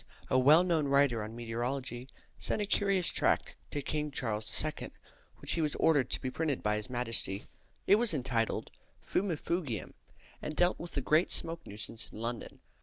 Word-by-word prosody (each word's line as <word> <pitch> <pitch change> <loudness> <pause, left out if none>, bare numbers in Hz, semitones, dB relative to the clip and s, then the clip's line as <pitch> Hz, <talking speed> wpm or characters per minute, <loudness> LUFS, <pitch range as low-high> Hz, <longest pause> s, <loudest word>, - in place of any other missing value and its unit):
a 130 - +5
well 150 +7 +7
known 165 -5 +1
writer 140 -4 +3
on 110 +2 -6
meteorology, 120 +2 -3 0.3
sent - - -1
a 210 - 0
curious 195 -3 +3
tract - - +1
to 145 - -3
King 150 +1 -2
Charles 110 -6 -2 0.2
II., 155 - -4 0.5
which - - -2
was 155 -3 0
ordered 145 -5 +3
to - - -2
be 130 - -3
printed 155 -3 -1
by 105 0 +2
his 105 +4 -5
Majesty. 115 -5 +2 0.4
It 200 - +6
was 235 0 +1
entitled 120 -6 -1 0.3
"Fumifugium," 170 - -2 0.5
and 155 - -4
dealt 175 +3 +2
with 170 - -7
the 140 - 0
great 155 +7 +3
smoke 165 0 -1
nuisance 105 +2 -5
in - - -9
London. 115 0 -5
140 Hz, 170 wpm, -32 LUFS, 115-165 Hz, 0.5 s, well